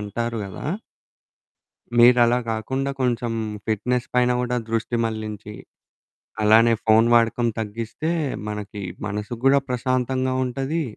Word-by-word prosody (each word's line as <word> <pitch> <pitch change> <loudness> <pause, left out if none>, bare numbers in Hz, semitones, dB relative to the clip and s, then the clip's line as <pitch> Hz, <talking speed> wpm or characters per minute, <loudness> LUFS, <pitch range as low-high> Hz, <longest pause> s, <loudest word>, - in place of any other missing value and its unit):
అంటారు 115 +3 -3
గదా! 95 +7 -7 1.3
మీరలా 120 0 +6
కాకుండా 130 +5 -2
కొంచెం 120 -2 0 0.3
ఫిట్‌నెస్ 120 +3 0
పైన 125 0 +3
గూడా 125 0 -1
దృష్టి 115 +1 -1
మళ్లించి, 110 -2 -5 0.9
అలానే 115 +2 +6
ఫోను 110 +1 +5
వాడకం 120 +1 +3
తగ్గిస్తే 115 +8 -4 0.4
మనకి 105 -1 -6 0.2
మనసు 105 +3 -4
కూడా 140 +1 +5
ప్రశాంతంగా 130 +1 0
ఉంటది. 135 +6 -2
120 Hz, 105 wpm, -23 LUFS, 110-125 Hz, 1.3 s, మీరలా